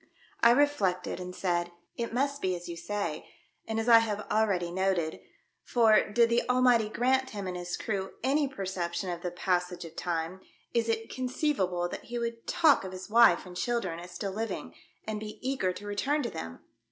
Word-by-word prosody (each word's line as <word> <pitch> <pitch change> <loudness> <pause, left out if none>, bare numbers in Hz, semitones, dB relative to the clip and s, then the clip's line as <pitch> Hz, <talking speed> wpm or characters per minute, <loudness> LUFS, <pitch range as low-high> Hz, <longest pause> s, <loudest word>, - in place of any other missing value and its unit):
I 235 - +7
reflected, 235 -11 +2
and 180 0 -6
said, 175 -2 0 0.2
"It 235 -1 -3
must 280 +4 0
be 185 -1 0
as 175 0 -8
you 170 - -5
say, 170 -2 -4 0.4
and 220 0 -1
as 225 - -2
I 230 -1 +9
have 210 -2 -2
ah'eady 195 -6 +1
noted; 185 -4 0 0.4
for, 225 -4 +4
did 235 +2 +4
the 235 - +4
Almighty 250 -3 +4
grant 260 +3 +1
him 205 -4 -5
and 185 -1 -4
his 175 0 -4
crew 195 -3 -3
any 280 +3 +2
perception 190 -6 -3
of 175 -1 -5
the 180 - -2
passage 180 0 -1
of 165 - -11
time, 170 +2 -3 0.3
is 230 -1 +1
it 225 0 -2
con 255 0 -2
ceivable 190 - 0
that - - -7
he 240 - -5
would 230 -1 -4
talk 305 -9 +4
of 190 -1 -6
his 185 +3 -8
wife 230 -7 +6
and 180 -1 -10
children 185 -4 -1
as 175 +1 -9
still 195 +2 -4
living, 225 +2 -4 0.3
and 215 -1 -3
be 215 0 -7
eager 260 -9 +1
to 205 - -9
return 280 +9 0
to 235 - -3
them 85 0 -7
205 Hz, 195 wpm, -29 LUFS, 180-235 Hz, 0.4 s, I